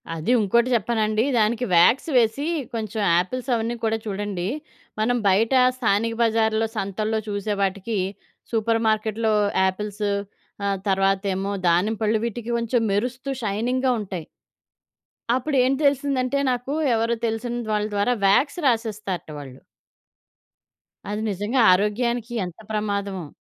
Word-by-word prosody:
అది 165 +9 -1
ఇంకోటి 235 +4 +2
చెప్పనాండి 220 0 +1 0.2
దానికి 230 +3 +1
వ్యాక్స్ 225 - +4
వేసి 240 +5 +2 0.3
కొంచెం 220 -1 -3 0.2
ఆపిల్స్ 255 +7 -5
అవన్నీ 230 +1 -2
కూడా 225 0 +1
చూడండి 200 -3 -3 0.5
మనం 245 +3 +2
బయట 215 +6 +3 0.2
స్థానిక 230 -1 +1
బజార్‌లో 225 -1 +2
సంతల్లో 215 +3 -1
చూసే 205 0 -2
వాటికి, 200 +3 -1 0.5
సూపర్ 225 0 +1
మార్కెట్‌లో 220 0 +1 0.3
యాపిల్స్ 205 +2 -2 0.6
ఆహ్, 200 -1 0
తర్వాతేమో 195 0 +1 0.2
దానిమ్మపళ్ళు 215 +5 +1
వీటికి 235 0 -5
కొంచెం 235 +1 0
మెరుస్తూ 245 +6 -2
షైనింగ్‌గా 245 +6 0
ఉంటాయి. 180 -5 -6 1.1
అప్పుడు 275 +3 -1
ఏం 260 +2 +2
తెలిసిందంటే 280 -1 +1
నాకు 250 +3 -3 0.2
ఎవరో 230 +1 +1
తెలిసిన 230 +2 -2 0.2
వాళ్ళ 210 0 0
ద్వారా 205 +5 +2
వాక్స్ 280 - +3
రాసేస్తారట 215 -8 -2
వాళ్ళు. 135 -2 -10 1.5
అది 210 +1 -2
నిజంగా 205 +7 -1
ఆరోగ్యానికి 230 +5 +1
యెంత 180 +1 -6
ప్రమాదమో! 200 -4 -2
220 Hz, 115 wpm, -23 LUFS, 200-235 Hz, 1.5 s, వ్యాక్స్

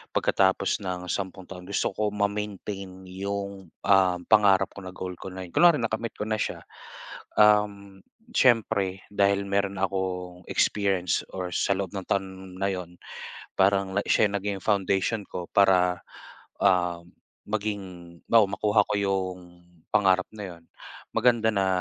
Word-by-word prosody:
pagkatapos 95 +1 +2
ng 90 -1 -4
sampung 95 -1 -4
taon, 90 -1 -10
gusto 100 - 0
ko 105 0 0
ma-maintain 100 -2 -3
'yong, 100 0 -5 0.2
ah, 95 -2 +5
pangarap 100 -3 +4
ko - - -10
na 95 0 -8
goal 90 -1 -5
ko - - -8
na 95 0 -7
'yo 85 - -14
kunwari 175 -2 +6
nakamit 115 0 -3
ko - - -4
na 110 -1 -1
siya. - - -3 0.8
Um, 105 -2 +3 0.3
siyempre 110 -6 +2
dahil 100 0 +2
meron 100 0 0
akong 90 -2 -3
experience 95 -5 +1
or 90 -1 -4
sa 100 - +1
loob 100 -3 -3
ng 95 -2 -6
taon 95 -1 -3
na 100 0 +1
'yon 90 -2 -6 0.6
parang 95 0 +2
na - - +4
siya - - +4
'yong 100 - -2
naging 100 -1 -3
foundation 100 +1 +1
ko 90 - -5
para, 90 -3 +4 0.6
ah, 90 -3 +2 0.5
maging 95 -5 -5
halimbawa 115 -3 +6
makuha 105 0 +4
ko - - 0
'yong 95 -2 -1 0.5
pangarap 95 -3 +3
na 105 - -6
'yon. 85 - -20 0.5
Maganda 115 -1 +3
na 100 -2 0
95 Hz, 145 wpm, -26 LUFS, 95-100 Hz, 0.8 s, kunwari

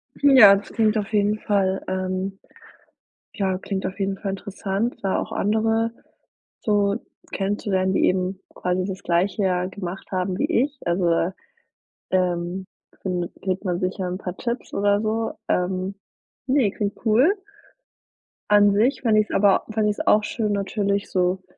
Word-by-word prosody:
Ja, 260 -8 +8
das 200 - -6
klingt 220 -1 +2
auf 210 0 -3
jeden 210 +1 +2
Fall 195 -3 0
ähm, 185 +1 -3 0.9
ja, 190 -2 -1
klingt 195 0 -4
auf 190 - -4
jeden 195 0 -1
Fall 195 - -3
interessant, 200 +3 -3
da 195 - +1
auch - - -5
andere 225 +2 +1 0.7
so 205 -2 +2 0.4
kennenzulernen, 195 -1 0
die - - +2
eben 185 +1 0
quasi 180 0 -1
das 190 -1 -5
Gleiche 180 +4 +1
ja 180 -1 +1
gemacht 185 -1 -7
haben 185 0 -1
wie - - +1 0.2
ich. 285 -1 -7
Also, 175 +1 +1
äh, 170 +2 +1 0.8
ähm, 180 0 0 0.4
findet 180 -2 -3
kriegt 190 +1 -2
man 175 -2 0
sicher 185 0 -2
'n 180 0 -3
paar 185 -2 -6
Tipps 240 +1 -4
oder 205 0 +2
so. 225 +1 -1 0.2
Ähm, 185 +2 -1 0.5
ne, 260 -6 +3
klingt 205 0 -3
cool. 245 - +5 1.2
An 205 0 +6
sich 225 +7 +2
fände 220 -3 +3
ich's 210 - 0
aber 200 -1 +4
fände 215 -1 +1
ich's 210 - -2
auch 215 - +4
schön 215 -1 -1
natürlich 200 0 -1
so 180 0 +1
195 Hz, 155 wpm, -23 LUFS, 185-210 Hz, 1.2 s, Ja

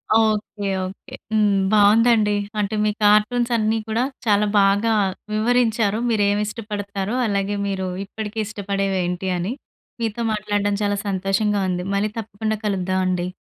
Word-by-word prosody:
Okay. 215 -2 +1 0.2
Okay. 190 - -11 0.2
హ్మ్. 210 -2 +3 0.2
బావుందండి. 215 0 +4 0.2
అంటే 205 +1 -1
మీ 210 - +2
కార్టూన్సన్నీ 220 +1 +3
కూడా 225 +3 0 0.2
చాలా 210 -1 +3
బాగా 200 +3 +3 0.4
వివరించారు 225 -1 +2
మీరేమి 205 -1 +2
ఇష్టపడతారో, 205 -1 -4
అలాగే 200 0 -1
మీరు 190 -1 -2 0.2
ఇప్పటికే 215 +2 -6
ఇష్టపడేవేంటి 195 -3 -2
అని. 185 +8 -2 0.5
మీతో 225 +1 -2
మాట్లాడడం 205 -1 -1
చాలా 205 0 0
సంతోషంగా 195 +2 0
ఉంది. 180 0 -2
మళ్ళీ 210 +1 0
తప్పకుండా 220 0 -3
కలుద్దామండి. 185 -2 0
205 Hz, 115 wpm, -22 LUFS, 195-220 Hz, 0.5 s, బావుందండి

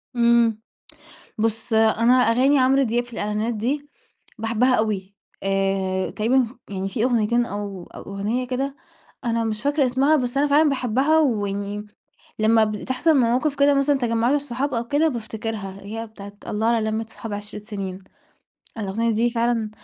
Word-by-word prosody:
امم، 235 -2 +3 0.8
بُص 225 +1 -1
أنا 225 +2 +4
أغاني 255 +3 +4
عمرو 265 +1 +4
دياب 240 0 0
في 240 - -15
الإعلانات 215 +2 -2
دي، 280 +7 -2 0.5
باحبَّها 230 +3 +2
أوي، 200 -3 -2 0.3
آآ، 195 -1 0
تقريبًا 240 +3 +2 0.2
يعني 195 0 -3
في 225 +3 -1
أغنيتين 235 -1 +2
أو 200 -4 -5
أو - - -8
أغنية 210 +6 -3
كده 270 +3 -3 0.5
أنا 230 -1 0
مش 215 -1 -3
فاكرة 285 -1 +2
اسمها 270 +5 +3
بس 250 -1 -2
أنا 290 +1 +3
فعلًا 295 +2 +4
باحبَّها، 270 +4 +2
ويعني 205 -5 -1 0.5
لمَّا 220 0 +4
بتحصل 255 +9 0
مواقف 260 +4 +2
كده 285 0 +5
مثلًا 275 0 +2
تجمعات 235 +2 +1
الصحاب 280 -1 -2
أو 235 0 -2
كده 305 +3 +3
بافتكرها، 220 -5 -5
هي 225 +3 -6
بتاعة 200 -2 -11
الله 215 +2 -1
على 225 -2 +2
لمة 220 +1 -2
صحاب 225 -2 -7
عِشرة 205 0 -6
سنين، 195 -4 -5 0.8
الأغنية 220 +3 -1
دي 235 +2 +2
فعلًا 230 -2 0
230 Hz, 150 wpm, -23 LUFS, 210-255 Hz, 0.8 s, كده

